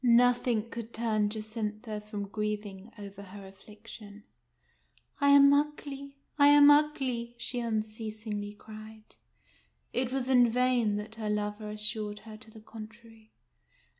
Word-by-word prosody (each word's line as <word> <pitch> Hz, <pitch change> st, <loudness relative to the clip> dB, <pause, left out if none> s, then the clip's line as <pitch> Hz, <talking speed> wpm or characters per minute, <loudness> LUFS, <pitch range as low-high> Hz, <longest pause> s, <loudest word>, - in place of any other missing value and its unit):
Nothing 240 Hz, -2 st, +3 dB
could 235 Hz, 0 st, -8 dB
turn 215 Hz, -2 st, +1 dB
Jacintha 215 Hz, 0 st, -5 dB
from 210 Hz, -1 st, -6 dB
grieving 210 Hz, 0 st, -4 dB
over 200 Hz, -1 st, -9 dB
her 200 Hz, 0 st, -11 dB
affliction. 210 Hz, +1 st, -13 dB, 0.5 s
" -, -, -33 dB
I 280 Hz, -, +5 dB
am 280 Hz, 0 st, +8 dB
ugly, 285 Hz, -1 st, -2 dB, 0.2 s
I 285 Hz, -, +7 dB
am 290 Hz, 0 st, +8 dB
ugly! 265 Hz, -6 st, +1 dB
" -, -, -35 dB
she 245 Hz, +1 st, -1 dB
unceasingly 215 Hz, -2 st, -4 dB
cried. 215 Hz, 0 st, -13 dB, 0.8 s
It 255 Hz, 0 st, 0 dB
was 265 Hz, -1 st, -2 dB
in 250 Hz, -2 st, +5 dB
vain 245 Hz, -3 st, +2 dB
that 210 Hz, +2 st, -5 dB
her 215 Hz, -, -2 dB
lover 210 Hz, 0 st, -2 dB
assured 210 Hz, 0 st, -1 dB
her 220 Hz, -1 st, -9 dB
to 220 Hz, +1 st, -14 dB
the 220 Hz, 0 st, -14 dB
contrary. 220 Hz, 0 st, -13 dB
220 Hz, 135 wpm, -30 LUFS, 210-245 Hz, 0.8 s, am